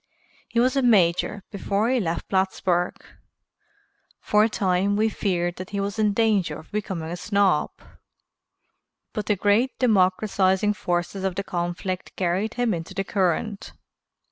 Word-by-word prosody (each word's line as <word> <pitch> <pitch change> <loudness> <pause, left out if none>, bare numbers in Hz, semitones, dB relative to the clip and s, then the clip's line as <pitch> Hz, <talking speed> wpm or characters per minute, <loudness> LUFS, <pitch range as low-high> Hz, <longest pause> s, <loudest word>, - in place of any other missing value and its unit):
He 235 - -1
was 255 +3 +3
a 275 - +3
major 205 -3 +3
before 200 +1 -1
he 255 0 +2
left 170 -5 -2
Plattsburgh. 190 -2 0 1.2
For 210 0 +3
a 220 - +2
time 195 -1 +1
we 220 +2 +2
feared 175 -5 -1
that 185 +1 -7
he 200 - -3
was 200 +2 -3
in 210 -1 +3
danger 200 -8 +1
of 155 - -14
becoming 190 -6 -3
a - - -3
snob, 190 -3 +1 1.4
but 215 -2 -4
the 210 - +3
great 205 +7 +2
democratizing 195 -2 +2
forces 175 0 -2
of 190 -2 -1
the 200 - -2
conflict 180 +1 -4
carried 190 +5 -1
him 245 -3 +1
into 165 -1 -6
the 195 - -1
current. 195 +2 -1
195 Hz, 145 wpm, -24 LUFS, 180-210 Hz, 1.4 s, was